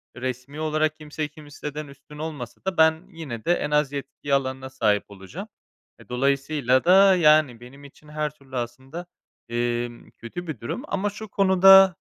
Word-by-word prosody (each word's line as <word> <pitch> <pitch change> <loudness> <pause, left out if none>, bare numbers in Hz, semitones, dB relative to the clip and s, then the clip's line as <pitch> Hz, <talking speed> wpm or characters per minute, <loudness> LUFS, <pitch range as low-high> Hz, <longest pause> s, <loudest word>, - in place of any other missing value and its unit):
resmî 130 +3 -5
olarak 155 0 0
kimseyi 150 0 -5
kimseden 150 0 -8
üstün 140 +2 -14
olmasa 150 -6 -6
da 190 - -1
ben 160 +2 +4
yine 140 - -7
de 175 - +4
en 150 - -2
az 150 -2 +2
yetki 140 0 -5
alanına 130 -1 -1
sahip 110 -6 +1
olacağım. 95 -2 -9 0.5
E, - - -17
dolayısıyla 135 0 +1
da, 190 +1 +7
yani, 150 -7 +4
benim 130 +4 -14
için 140 +2 -16
her 150 0 -2
türlü 140 -3 -14
aslında, 130 +8 -6 0.4
emm, 120 0 -2
kötü 175 +10 -8
bir 155 -8 -5
durum. 115 - -5
Ama 200 +1 -1
şu 215 +2 -9
konuda, 190 -1 +7
145 Hz, 160 wpm, -24 LUFS, 130-160 Hz, 0.5 s, da